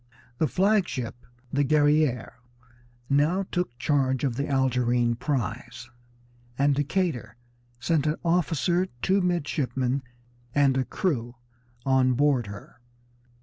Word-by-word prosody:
The 155 Hz, -, +3 dB
flag 200 Hz, +2 st, +2 dB
ship, 120 Hz, -2 st, -6 dB, 0.3 s
the 145 Hz, +1 st, +2 dB
Guerrière, 145 Hz, -2 st, +2 dB, 0.8 s
now 150 Hz, +8 st, +2 dB
took 175 Hz, -10 st, -2 dB
charge 130 Hz, -1 st, +1 dB
of 130 Hz, -4 st, 0 dB
the 140 Hz, +3 st, -2 dB
Algerine 125 Hz, -3 st, +1 dB
prize, 120 Hz, -2 st, -4 dB, 0.7 s
and 140 Hz, +1 st, +3 dB
Decatur 140 Hz, -, -1 dB, 0.4 s
sent 150 Hz, +4 st, +1 dB
an 150 Hz, -, +1 dB
officer, 175 Hz, +1 st, +1 dB, 0.2 s
two 195 Hz, +1 st, +3 dB
midshipmen, 140 Hz, -7 st, -1 dB, 0.5 s
and 140 Hz, -2 st, +4 dB
a 130 Hz, -1 st, +1 dB
crew 125 Hz, -9 st, -2 dB, 0.5 s
on 130 Hz, -1 st, +3 dB
board 135 Hz, -4 st, +2 dB
her. 100 Hz, +3 st, -11 dB
140 Hz, 110 wpm, -26 LUFS, 125-155 Hz, 0.8 s, and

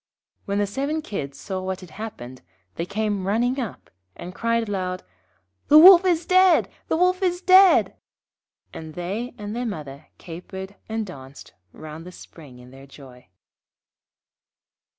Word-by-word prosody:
When 200 Hz, 0 st, -2 dB
the 205 Hz, -, +1 dB
seven 280 Hz, +9 st, -3 dB
Kids 140 Hz, -, -6 dB
saw 190 Hz, -1 st, -5 dB
what 185 Hz, 0 st, -5 dB
had 180 Hz, -3 st, -13 dB
happened, 130 Hz, -, -9 dB, 0.3 s
they 170 Hz, -, -5 dB
came 205 Hz, -2 st, -2 dB
running 240 Hz, +6 st, 0 dB
up, 235 Hz, -6 st, -7 dB, 0.2 s
and 180 Hz, -, -9 dB
cried 230 Hz, +1 st, -1 dB
aloud 185 Hz, -2 st, -4 dB, 0.6 s
'The 300 Hz, -, +7 dB
Wolf 360 Hz, +3 st, +9 dB
is 345 Hz, -2 st, +1 dB
dead, 370 Hz, -1 st, +4 dB, 0.2 s
the -, -, 0 dB
Wolf 365 Hz, +2 st, +2 dB
is 355 Hz, -2 st, 0 dB
dead!' 375 Hz, 0 st, +5 dB, 0.8 s
and 160 Hz, -1 st, -9 dB
they 200 Hz, +8 st, -5 dB
and 210 Hz, +1 st, -6 dB
their 245 Hz, -, -3 dB
mother 150 Hz, -7 st, -8 dB
capered 190 Hz, +3 st, -9 dB
and 220 Hz, 0 st, -3 dB
danced 135 Hz, -6 st, -12 dB, 0.2 s
round 155 Hz, +1 st, -10 dB
the -, -, -9 dB
spring 150 Hz, -7 st, -14 dB
in 125 Hz, 0 st, -15 dB
their 135 Hz, +1 st, -14 dB
joy. 130 Hz, -3 st, -15 dB
200 Hz, 150 wpm, -23 LUFS, 160-255 Hz, 0.8 s, Wolf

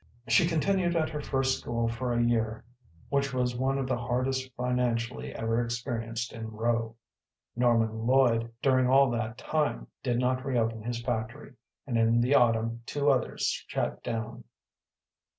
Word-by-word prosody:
She 175 Hz, -4 st, +4 dB
continued 175 Hz, +2 st, +1 dB
at 160 Hz, -1 st, +1 dB
her 150 Hz, -1 st, -4 dB
first 135 Hz, -2 st, 0 dB
school 115 Hz, 0 st, -1 dB
for 120 Hz, +2 st, -2 dB
a 120 Hz, 0 st, +2 dB
year, 115 Hz, -2 st, 0 dB, 0.5 s
which 140 Hz, -1 st, 0 dB
was 125 Hz, -1 st, 0 dB
one 135 Hz, +2 st, 0 dB
of 135 Hz, -, -1 dB
the 130 Hz, -2 st, -1 dB
hardest 130 Hz, +2 st, -1 dB
financially 125 Hz, -1 st, -1 dB
ever 115 Hz, +1 st, 0 dB
experienced 115 Hz, -1 st, -3 dB
in 115 Hz, -1 st, -6 dB
Rowe. 115 Hz, +1 st, -1 dB, 0.6 s
Norman 115 Hz, -2 st, +2 dB
Lloyd 120 Hz, -3 st, +3 dB
during 130 Hz, -2 st, +4 dB
all 135 Hz, -1 st, +5 dB
that 115 Hz, -1 st, -3 dB
time 150 Hz, -, -1 dB, 0.2 s
did 120 Hz, -1 st, 0 dB
not 130 Hz, +1 st, 0 dB
reopen 115 Hz, -4 st, 0 dB
his 120 Hz, +1 st, -4 dB
factory, 115 Hz, +5 st, -4 dB, 0.3 s
and 120 Hz, -4 st, 0 dB
in 115 Hz, +1 st, +4 dB
the 125 Hz, +4 st, +2 dB
autumn 115 Hz, -2 st, +3 dB
two 145 Hz, 0 st, +2 dB
others 130 Hz, -, -1 dB, 0.2 s
shut -, -, -2 dB
down. 115 Hz, +1 st, -4 dB
120 Hz, 150 wpm, -29 LUFS, 115-130 Hz, 0.6 s, all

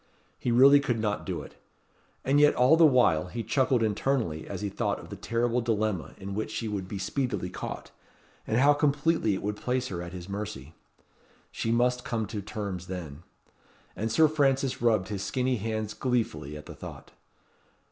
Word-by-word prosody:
He -, -, -2 dB
really 135 Hz, +4 st, +7 dB
could 120 Hz, -5 st, -1 dB
not 105 Hz, -1 st, -2 dB
do -, -, -3 dB
it. -, -, -15 dB, 0.6 s
And 140 Hz, +2 st, +3 dB
yet 150 Hz, 0 st, +5 dB
all 125 Hz, +5 st, +5 dB
the 165 Hz, -1 st, +7 dB
while 120 Hz, -, +3 dB
he 115 Hz, +5 st, -5 dB
chuckled 130 Hz, -2 st, +2 dB
internally 110 Hz, -, -1 dB
as 95 Hz, -2 st, -5 dB
he 105 Hz, -, -2 dB
thought -, -, -1 dB
of -, -, -11 dB
the -, -, -5 dB
terrible 120 Hz, +1 st, 0 dB
dilemma 110 Hz, -, -1 dB
in 100 Hz, 0 st, -6 dB
which 110 Hz, +2 st, -2 dB
she 115 Hz, -, -3 dB
would 100 Hz, -3 st, -3 dB
be 100 Hz, -, -5 dB
speedily 100 Hz, -2 st, -2 dB
caught, -, -, -6 dB, 0.6 s
and 110 Hz, -, +1 dB
how 140 Hz, +3 st, +6 dB
completely 145 Hz, -5 st, +1 dB
it -, -, -6 dB
would 105 Hz, +1 st, -2 dB
place 125 Hz, +2 st, -1 dB
her 85 Hz, -3 st, -4 dB
at 85 Hz, 0 st, -7 dB
his 90 Hz, -1 st, -8 dB
mercy. 100 Hz, -7 st, -6 dB, 0.8 s
She 115 Hz, -, -2 dB
must 125 Hz, +1 st, +2 dB
come 115 Hz, -2 st, -2 dB
to 105 Hz, -3 st, -4 dB
terms 100 Hz, -3 st, -5 dB
then. 85 Hz, -5 st, -6 dB, 0.7 s
And 110 Hz, +2 st, -2 dB
Sir 155 Hz, +7 st, +5 dB
Francis 135 Hz, -4 st, +1 dB
rubbed 110 Hz, -5 st, +2 dB
his 100 Hz, -3 st, -3 dB
skinny 125 Hz, +4 st, 0 dB
hands 110 Hz, 0 st, -3 dB
gleefully 115 Hz, -, -2 dB
at 75 Hz, -, -11 dB
the -, -, -9 dB
thought. -, -, -10 dB
110 Hz, 185 wpm, -28 LUFS, 100-130 Hz, 0.8 s, really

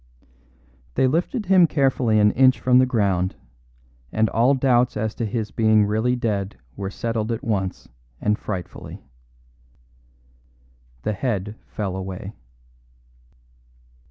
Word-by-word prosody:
They -, -, +3 dB
lifted 175 Hz, -, 0 dB
him 185 Hz, -2 st, +5 dB
carefully 130 Hz, -7 st, +2 dB
an 105 Hz, 0 st, +5 dB
inch 130 Hz, -2 st, +4 dB
from 125 Hz, +2 st, +4 dB
the 130 Hz, -, +4 dB
ground, 100 Hz, -6 st, 0 dB, 0.8 s
and 110 Hz, 0 st, +1 dB
all 125 Hz, +5 st, +3 dB
doubts 125 Hz, -3 st, +2 dB
as 110 Hz, +1 st, -2 dB
to 115 Hz, -, -3 dB
his 110 Hz, 0 st, -3 dB
being 110 Hz, -2 st, +3 dB
really 110 Hz, +4 st, +1 dB
dead 100 Hz, -, -2 dB, 0.2 s
were 95 Hz, -1 st, -4 dB
settled 115 Hz, +1 st, -3 dB
at 115 Hz, -, -3 dB
once 95 Hz, -5 st, -2 dB, 0.3 s
and 105 Hz, +1 st, 0 dB
frightfully. 95 Hz, -5 st, -7 dB, 2.0 s
The 110 Hz, -, -1 dB
head 105 Hz, -1 st, -2 dB
fell 100 Hz, -3 st, -4 dB
away. 95 Hz, +1 st, -6 dB
110 Hz, 120 wpm, -23 LUFS, 100-125 Hz, 2.0 s, him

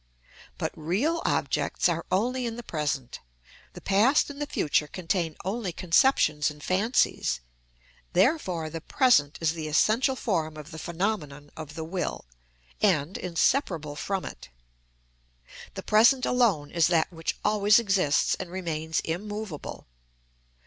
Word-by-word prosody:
But -, -, -2 dB
real 225 Hz, -, 0 dB
objects -, -, +1 dB
are -, -, -2 dB
only 245 Hz, +6 st, 0 dB
in 230 Hz, -, -4 dB
the 240 Hz, -, -7 dB
present; 145 Hz, -, -3 dB, 0.5 s
the -, -, -10 dB
past 225 Hz, +10 st, +3 dB
and 285 Hz, +1 st, -9 dB
the 295 Hz, -, -2 dB
future 150 Hz, -, +1 dB
contain 170 Hz, -2 st, -2 dB
only 200 Hz, -1 st, -2 dB
conceptions 165 Hz, -, +3 dB
and 150 Hz, 0 st, -11 dB
fancies, 200 Hz, -, +1 dB, 0.7 s
therefore 180 Hz, -, +1 dB
the 165 Hz, -, -5 dB
present 160 Hz, -, +3 dB
is 165 Hz, -1 st, +1 dB
the 160 Hz, -2 st, -5 dB
essential 225 Hz, -, +2 dB
form 160 Hz, -10 st, -2 dB
of 155 Hz, +2 st, -10 dB
the 160 Hz, -, -8 dB
phenomenon 160 Hz, -5 st, -3 dB
of 155 Hz, -1 st, -8 dB
the 160 Hz, -, -4 dB
will, 175 Hz, -, -4 dB, 0.6 s
and 175 Hz, -4 st, +2 dB
inseparable 170 Hz, -, 0 dB
from 195 Hz, +5 st, -3 dB
it. -, -, -9 dB, 1.3 s
The -, -, -6 dB
present 240 Hz, +5 st, +5 dB
alone 205 Hz, -13 st, +2 dB
is 170 Hz, -3 st, +3 dB
that 170 Hz, 0 st, +1 dB
which 165 Hz, -1 st, -3 dB
always 210 Hz, 0 st, +5 dB
exists 190 Hz, -9 st, +2 dB
and 185 Hz, -, -5 dB
remains 160 Hz, -3 st, -2 dB
immovable. 205 Hz, 0 st, -5 dB
180 Hz, 135 wpm, -27 LUFS, 155-220 Hz, 1.3 s, present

